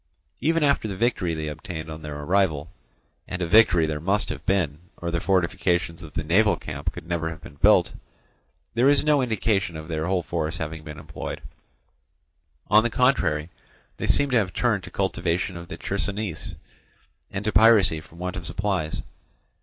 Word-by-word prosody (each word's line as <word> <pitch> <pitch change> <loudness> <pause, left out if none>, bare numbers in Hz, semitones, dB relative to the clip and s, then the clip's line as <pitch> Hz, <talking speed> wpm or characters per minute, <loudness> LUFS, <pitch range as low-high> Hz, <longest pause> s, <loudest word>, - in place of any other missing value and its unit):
Even 165 +3 +2
after 140 -6 +2
the 95 -3 -5
victory 100 -8 0
they 80 -1 -4
obtained 80 +1 -6
on 80 0 -7
their 75 -1 -6
arrival—and 80 -4 -3
a 90 - 0
victory 90 -3 +5
there 75 -1 -2
must 100 +6 +1
have 75 - -5
been, 85 -7 +1 0.2
or 85 0 -4
the 85 - 0
fortifications 85 -1 +1
of 80 -3 -11
the 80 - -2
naval 95 +5 +4
camp 75 +1 -5
could - - -10
never 85 -1 -1
have 80 - -8
been - - -11
built—there 120 - 0
is 145 - +4
no 150 -2 +3
indication 105 -7 0
of 80 0 -8
their 80 0 -2
whole 90 -2 +1
force 80 -1 -2
having 80 0 -5
been 75 -1 -8
employed; - - -6 1.3
on 105 +1 +6
the 120 - 0
contrary, 90 - +1 0.5
they - - -3
seem 140 -1 +3
to 125 - +4
have 100 -5 0
turned 110 -6 +1
to 90 - -8
cultivation 90 -1 -1
of 85 0 -8
the 95 - -7
Chersonese 100 -3 -3 0.7
and 100 +1 -4
to 110 - +2
piracy 105 -6 +5
from 80 +1 -17
want 90 +1 -4
of 90 -4 -5
supplies. 95 -6 -2
90 Hz, 175 wpm, -25 LUFS, 80-105 Hz, 1.3 s, on